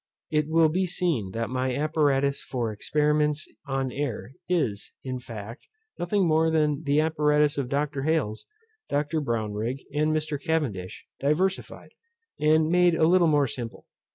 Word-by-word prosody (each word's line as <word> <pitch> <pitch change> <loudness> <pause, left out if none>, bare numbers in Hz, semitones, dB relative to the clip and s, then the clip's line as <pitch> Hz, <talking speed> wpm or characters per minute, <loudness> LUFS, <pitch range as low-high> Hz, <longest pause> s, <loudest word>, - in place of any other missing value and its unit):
It 150 -1 +1
will 160 0 +4
be 185 +4 0
seen 165 - -1
that 115 0 -3
my 130 0 -1
apparatus 140 -2 +1
for 120 -4 -3
experiments 150 +6 0 0.2
on 135 -1 -1
air 130 -4 -4 0.2
is, 130 - -1
in 130 -1 -4
fact, 115 0 -9 0.3
nothing 185 +1 +1
more 160 0 +3
than 150 -2 +1
the 145 +1 +3
apparatus 150 -1 +2
of 130 -3 -2
Dr. 140 0 -1
Hales, 145 -8 -1 0.4
Dr. 150 +2 0
Brownrigg, 115 0 -2
and 150 +1 +2
Mr. 155 -2 -1
Cavendish, 125 - -2
diversified, 180 +7 -1 0.5
and 155 +1 +4
made 175 -1 +4
a 160 - +3
little 175 0 +5
more 145 -2 +4
simple. 120 -2 -6
150 Hz, 145 wpm, -26 LUFS, 130-160 Hz, 0.5 s, little